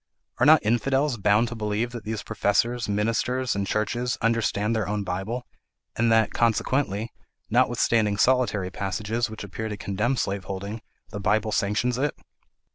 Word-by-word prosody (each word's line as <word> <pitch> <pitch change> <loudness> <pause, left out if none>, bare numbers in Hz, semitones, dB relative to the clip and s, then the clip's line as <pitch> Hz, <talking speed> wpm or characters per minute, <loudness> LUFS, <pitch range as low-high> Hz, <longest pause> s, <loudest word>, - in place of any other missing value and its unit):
Are 130 - +4
not 155 -6 +6
infidels 135 +4 +1
bound 105 +3 +3
to 120 - -6
believe 110 +2 -1
that 120 -3 -8
these 110 0 -3
professors, 115 +3 0
ministers, 115 +5 0
and 100 0 -1
churches 120 +4 -1
understand 115 -1 +1
their 110 -4 -1
own 105 0 -1
Bible, 100 +7 -3 0.5
and 115 0 +2
that, 110 0 +4
consequently, 115 -1 0 0.4
notwithstanding 105 -3 +2
solitary 115 -7 +2
passages 105 +5 -2
which 110 -1 -7
appear 110 +3 -5
to 105 - -5
condemn 105 +7 -1
slaveholding, 100 +2 -3 0.3
the 105 - -5
Bible 105 +2 +1
sanctions 110 +5 0
it? 145 +1 0
110 Hz, 145 wpm, -25 LUFS, 100-120 Hz, 0.5 s, not